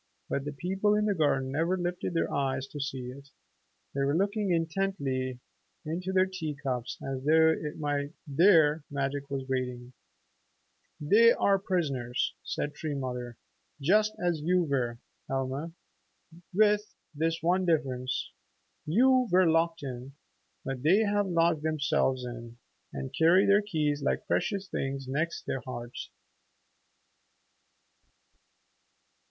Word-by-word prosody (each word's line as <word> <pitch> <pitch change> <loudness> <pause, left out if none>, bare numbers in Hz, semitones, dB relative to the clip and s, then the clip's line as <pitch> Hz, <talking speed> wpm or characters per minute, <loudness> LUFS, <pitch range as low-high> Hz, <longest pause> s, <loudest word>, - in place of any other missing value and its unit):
But 140 - -2
the 145 - -3
people 190 +7 0
in 210 0 +1
the 210 - +2
garden 140 -6 +1
never 165 +6 +1
lifted 175 0 -3
their 165 - 0
eyes 135 -1 -1
to 145 - -7
see 130 -3 -4
it. 140 +2 -13 0.6
They 140 - -1
were 140 +3 +2
looking 200 +1 0
intently 160 -7 -1 0.5
into 180 +4 -3
their 185 0 +4
tea 185 -6 -5
cups 130 -3 -3
as 135 -1 -4
though 160 +2 +5
it 150 -1 -4
might 145 -1 -1 0.2
be 145 - -9
there 160 -3 +5
magic 140 0 -3
was 135 -1 -3
waiting. 125 -1 -3 1.1
"They 220 +10 +6
are 195 -1 +2
prisoners," 140 - -1
said 145 - -3
Tree 155 -2 -4
Mother, 125 -3 -5 0.4
"just 210 +9 +3
as 175 -3 0
you 180 +3 +2
were, 130 -6 -1 0.3
Helma, 135 +4 -3 0.8
with 210 +2 +2 0.2
this 165 +2 0
one 180 +3 +2
difference. 130 -6 -1 0.6
You 255 +8 +4
were 185 +1 +5
locked 165 0 +1
in, 130 0 -6 0.5
but 135 -1 -4
they 175 +9 +4
have 205 -1 +1
locked 165 -3 +2
themselves 140 -4 0
in 120 -1 -8 0.3
and 135 0 -6
carry 170 +5 +5
their 200 +1 +5
keys 155 -8 -1
like - - -1
precious 195 -1 -1
things 135 -4 -3
next 155 +6 -2
their 135 - -3
hearts." 120 -1 -7
150 Hz, 135 wpm, -29 LUFS, 135-180 Hz, 1.1 s, They